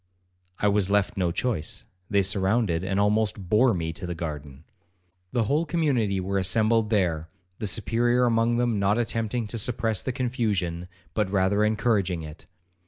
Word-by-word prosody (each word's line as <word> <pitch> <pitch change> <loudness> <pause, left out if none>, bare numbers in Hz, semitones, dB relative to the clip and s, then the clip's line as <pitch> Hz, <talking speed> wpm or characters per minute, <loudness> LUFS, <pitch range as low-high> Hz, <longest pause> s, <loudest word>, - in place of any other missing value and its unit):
I 105 - +1
was 100 -1 +2
left 100 -1 +1
no 90 -3 0
choice; 100 -5 -2 0.3
they 100 -1 +3
surrounded 95 -2 +1
and 95 +1 -1
almost 105 -1 +1
bore 120 +5 +4
me 80 -5 -2
to 90 +2 -7
the 85 - -4
garden. 75 -4 -6 0.7
'The 120 -2 +1
whole 145 +9 +1
community 135 - 0
were 95 +1 -1
assembled 110 +4 +2
there, 85 -7 0 0.3
the 105 - -2
Superior 120 +5 +2
among 115 0 +2
them 120 -3 +1
not 100 +2 +2
attempting 115 0 -1
to 115 +2 -3
suppress 110 -2 -1
the 130 - -2
confusion, 105 -9 -2 0.3
but 105 -3 0
rather 100 +1 +2
encouraging 105 -5 +1
it. 75 +1 -11
105 Hz, 160 wpm, -26 LUFS, 95-115 Hz, 0.7 s, bore